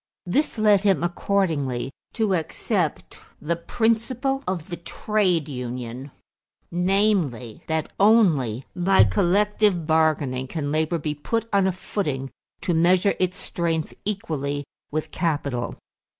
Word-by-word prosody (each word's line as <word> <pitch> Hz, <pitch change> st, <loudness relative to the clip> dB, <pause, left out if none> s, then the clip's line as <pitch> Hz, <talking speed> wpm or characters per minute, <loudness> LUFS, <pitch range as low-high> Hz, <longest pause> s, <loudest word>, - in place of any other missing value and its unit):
This 260 Hz, +10 st, 0 dB
led 210 Hz, -3 st, +5 dB
him, 195 Hz, -4 st, +2 dB
accordingly, 160 Hz, -8 st, 0 dB, 0.2 s
to 220 Hz, -4 st, +1 dB
accept 165 Hz, -3 st, -2 dB, 0.2 s
the 170 Hz, +3 st, -1 dB
principle 235 Hz, +8 st, 0 dB
of 180 Hz, -2 st, -3 dB
the 175 Hz, -, -3 dB
trade 180 Hz, -3 st, 0 dB
union; 125 Hz, 0 st, -5 dB, 0.6 s
namely, 180 Hz, -, +1 dB
that 160 Hz, -1 st, -1 dB
only 160 Hz, -, +4 dB
by 185 Hz, -, +5 dB
collective 190 Hz, -, +2 dB
bargaining 155 Hz, -5 st, +1 dB
can 145 Hz, -1 st, -3 dB
labor 155 Hz, +2 st, +1 dB
be 150 Hz, -1 st, -2 dB
put 225 Hz, +10 st, -2 dB
on 195 Hz, -1 st, +4 dB
a -, -, +2 dB
footing 150 Hz, -8 st, -3 dB, 0.3 s
to 175 Hz, -, 0 dB
measure 180 Hz, +4 st, +4 dB
its 185 Hz, 0 st, 0 dB
strength 165 Hz, -4 st, -2 dB
equally 145 Hz, -8 st, -2 dB, 0.3 s
with 155 Hz, +1 st, -3 dB
capital. 145 Hz, -7 st, -1 dB
170 Hz, 120 wpm, -24 LUFS, 145-200 Hz, 0.6 s, led